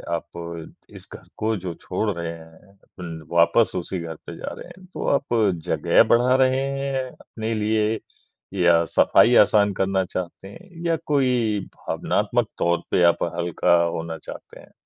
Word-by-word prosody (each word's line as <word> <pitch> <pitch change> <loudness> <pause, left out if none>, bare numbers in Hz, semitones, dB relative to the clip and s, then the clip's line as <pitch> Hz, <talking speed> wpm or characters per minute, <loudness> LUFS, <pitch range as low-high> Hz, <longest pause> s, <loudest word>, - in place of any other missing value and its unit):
आप 85 -1 -7 0.2
इस - - -11
घर - - -12
को 110 +1 0
जो 90 -2 -5
छोड़ 110 - -2
रहे 85 -3 -4
हैं 85 +4 -15 0.2
ल 80 -2 -7
वापस 85 +7 +4
उसी 90 0 -3
घर 80 -1 -6
पे - - -8
जा - - -6
रहे - - -10
हैं 180 +1 -15
तो - - -4
आप 140 -3 -1 0.3
जगह - - +4
बढ़ा 125 +2 +4
रहे 130 0 +3 0.2
हैं 135 -1 -2
अपने 110 0 -6
लिए 110 0 0 0.5
या 85 -3 +4
सफ़ाई 120 +7 +4
आसान 105 -1 +5
करना 95 0 0
चाहते 90 +1 -6
हैं? 170 - -14 0.2
या 165 -1 +2
कोई 125 -7 +1 0.2
भावनात्मक - - -1
तौर 85 0 +2
पे 90 - +3
आप 85 -1 +3
हल्का 85 0 +2
होना 80 -1 -3
चाहते - - -11
हैं? - - -17
100 Hz, 160 wpm, -23 LUFS, 85-115 Hz, 0.5 s, आसान